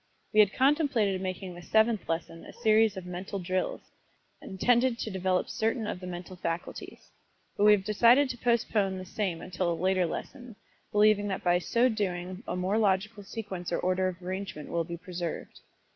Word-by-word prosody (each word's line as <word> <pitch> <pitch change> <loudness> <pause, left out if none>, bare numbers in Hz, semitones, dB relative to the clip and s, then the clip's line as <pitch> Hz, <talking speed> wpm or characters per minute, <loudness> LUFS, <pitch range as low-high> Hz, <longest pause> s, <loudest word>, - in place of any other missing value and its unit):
We 215 - +4
had 205 -2 +6
contemplated 265 - +2
making 185 0 -4
this 175 0 -12
Seventh 220 -1 +2
Lesson 165 0 -3
a - - -11
series 220 -3 +3
of 185 - -6
Mental 185 +3 -5
Drills, 185 0 -2 0.6
intended 240 +5 +2
to 220 - -4
develop 185 -1 0
certain 225 +1 -1
of 180 - -4
the 180 - -8
mental 180 +1 -7
faculties, 170 -1 -6 0.4
but 205 - +2
we 210 - +8
have 200 -2 +1
decided 235 +7 +5
to 245 - -8
postpone 220 -5 +1
the 185 - -7
same 185 -3 -3
until 180 -1 -1
a - - 0
later 185 -1 +2
lesson, 245 - -7 0.4
believing 210 0 +4
that 190 - -3
by 175 0 +3
so 235 +7 +2
doing 185 -4 -3
a - - -2
more 185 +4 0
logical 205 +1 +1
sequence 195 -3 -6
or - - +1
order 185 +1 +1
of 185 -1 -5
arrangement 185 -4 -5
will 170 0 0
be 170 +1 -6
preserved. 175 -1 -6
190 Hz, 180 wpm, -29 LUFS, 180-220 Hz, 0.6 s, we